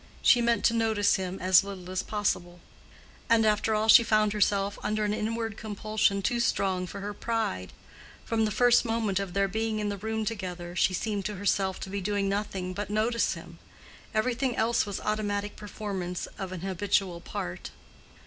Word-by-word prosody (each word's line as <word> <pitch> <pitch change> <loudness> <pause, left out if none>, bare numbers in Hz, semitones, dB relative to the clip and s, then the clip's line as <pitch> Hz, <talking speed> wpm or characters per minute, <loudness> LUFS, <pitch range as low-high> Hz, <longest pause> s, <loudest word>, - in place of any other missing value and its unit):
She 245 - +6
meant 235 0 +2
to 230 - +4
notice 220 -3 +2
him 190 0 -4
as 185 0 +5
little 185 -2 -8
as 185 - 0
possible. 180 -4 -2 0.7
And 230 -1 +5
after 215 +1 +2
all 215 +1 +1
she 225 - +9
found 215 -2 +2
herself 200 -1 +1
under 215 0 0
an 210 - 0
inward 225 0 -2
compulsion 215 -1 0
too 240 +5 +1
strong 190 -5 0
for 200 - -7
her 205 +1 -4
pride. 215 - -2 0.5
From 225 -1 +1
the - - 0
first 245 +3 +4
moment 225 -4 0
of 195 -2 -5
their 200 0 +3
being 220 +2 -1
in 210 -1 -1
the 200 - -3
room 220 +2 -2
together, 180 -5 -5
she 185 +1 +2
seemed 205 0 -2
to 210 - -3
herself 195 -1 0
to - - -5
be 200 0 -2
doing 200 +1 0
nothing 195 -2 -2
but 205 +1 -4
notice 220 +3 +1
him; - - -12 0.5
everything 240 +3 0
else 230 0 +1
was 200 - -3
automatic 205 -1 -2
performance 195 -4 -5
of 190 -1 -4
an 185 -2 -6
habitual 190 -1 0
part. 90 - -5
205 Hz, 180 wpm, -28 LUFS, 190-220 Hz, 0.7 s, she